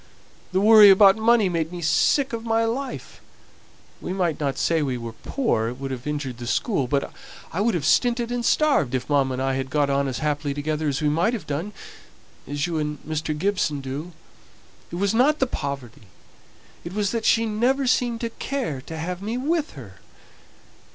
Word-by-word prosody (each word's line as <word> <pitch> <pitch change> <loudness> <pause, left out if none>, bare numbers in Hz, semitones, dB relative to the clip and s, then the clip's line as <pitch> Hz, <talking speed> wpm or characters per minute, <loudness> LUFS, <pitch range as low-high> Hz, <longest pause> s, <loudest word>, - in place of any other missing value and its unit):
The 185 - +1
worry 215 0 +8
about 195 0 +7
money 220 -1 +3
made 165 -2 -2
me 175 - -6
sick 265 - +2
of 225 -1 -4
my 225 0 +1
life. 255 +4 -5 0.8
We 180 - -4
might 175 -5 -1
not 140 -3 -2
say 165 -1 +1
we 130 -4 -1
were 115 -1 -7
poor, 115 - -1
it 125 +2 -8
would 135 0 -5
have 130 +1 -6
injured 145 -5 -4
the 120 - -6
school; 140 - 0
but 140 +2 -1 0.4
I 180 - -1
would 225 -1 +1
have 155 -5 -2
stinted 240 - +2
and 245 -1 -2
starved 275 - +2
if 130 - -3
mamma 140 -3 +1
and 130 - -3
I 135 0 0
had 130 0 -3
got 145 0 +1
on 140 0 +1
as 130 - -3
happily 145 -2 -2
together 155 +1 -2
as 145 +2 -1
we 150 - +3
might 170 +10 +1
have 220 - -7
done 160 +8 -3 0.8
as 145 +2 -2
you 170 -2 -2
and 150 0 -3
Mr. 155 0 -3
Gibson 185 -4 0
do. 140 +6 -6 0.8
It - - -7
was 200 +3 0
not 275 +7 +3
the 265 - +2
poverty; 135 - -6 0.8
it 170 - -7
was 205 -1 0
that 230 -1 -2
she 230 +1 +3
never 245 +6 +1
seemed 245 -2 +1
to 230 -1 -3
care 235 - -4
to 160 +4 -8
have 180 +3 -4
me 220 +4 -3
with 305 +4 -1
her. 110 -10 -12
165 Hz, 200 wpm, -23 LUFS, 140-225 Hz, 0.8 s, worry